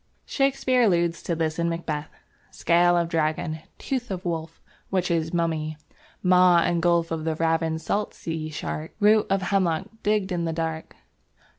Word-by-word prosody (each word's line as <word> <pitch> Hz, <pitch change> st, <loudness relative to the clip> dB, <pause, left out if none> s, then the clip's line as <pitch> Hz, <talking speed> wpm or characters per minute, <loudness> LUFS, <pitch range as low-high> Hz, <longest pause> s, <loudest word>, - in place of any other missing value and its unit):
Shakespeare 270 Hz, -2 st, +1 dB
alludes 170 Hz, -6 st, +2 dB
to 170 Hz, -, -2 dB
this 160 Hz, 0 st, -2 dB
in 170 Hz, 0 st, +1 dB
Macbeth. 160 Hz, -3 st, -3 dB, 0.4 s
"Scale 175 Hz, +1 st, +3 dB
of 170 Hz, -1 st, +1 dB
Dragon; 155 Hz, 0 st, -1 dB, 0.2 s
tooth 255 Hz, -3 st, -3 dB
of 185 Hz, -1 st, -5 dB
wolf; 165 Hz, -1 st, -4 dB, 0.3 s
witches' 170 Hz, -4 st, 0 dB
mummy; 160 Hz, -3 st, -1 dB, 0.5 s
maw 180 Hz, -1 st, +6 dB
and 170 Hz, 0 st, +2 dB
gulf 170 Hz, -1 st, +2 dB
of 160 Hz, -1 st, -2 dB
the 160 Hz, 0 st, -1 dB
ravin'd 160 Hz, 0 st, 0 dB
salt 210 Hz, +1 st, -1 dB
sea 160 Hz, -1 st, -4 dB
shark; 155 Hz, +1 st, -5 dB
root 210 Hz, 0 st, +4 dB
of 195 Hz, -1 st, +1 dB
hemlock 180 Hz, -4 st, +1 dB, 0.2 s
digg'd 205 Hz, -3 st, 0 dB
i' -, -, -1 dB
the 165 Hz, -1 st, -1 dB
dark 160 Hz, -1 st, -4 dB
170 Hz, 155 wpm, -25 LUFS, 160-185 Hz, 0.5 s, maw